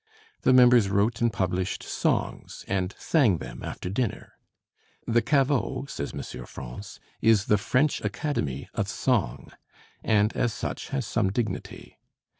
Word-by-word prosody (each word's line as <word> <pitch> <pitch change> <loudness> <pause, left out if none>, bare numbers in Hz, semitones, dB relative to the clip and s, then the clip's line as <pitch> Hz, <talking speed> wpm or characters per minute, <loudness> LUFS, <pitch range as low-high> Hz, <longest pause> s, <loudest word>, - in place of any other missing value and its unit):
The - - +4
members 125 -4 +6
wrote 105 +4 +1
and 120 -1 +3
published 95 -2 -1
songs - - -2
and 95 0 -1
sang 130 - +3
them - - -8
after - - -6
dinner. 105 +4 -3 0.7
"The 120 +1 +3
Caveau," 135 -1 +1
says 70 - -5
M. 60 - -7
France, 65 - -9 0.2
"is 110 -3 +4
the 105 - +3
French 135 +8 +1
Academy 75 - -2
of - - -1
song," - - -1 0.5
and 105 0 +2
as 120 -3 +1
such - - -5
has 135 -3 -2
some 105 -4 0
dignity. 110 +2 -4
110 Hz, 135 wpm, -26 LUFS, 95-125 Hz, 0.7 s, members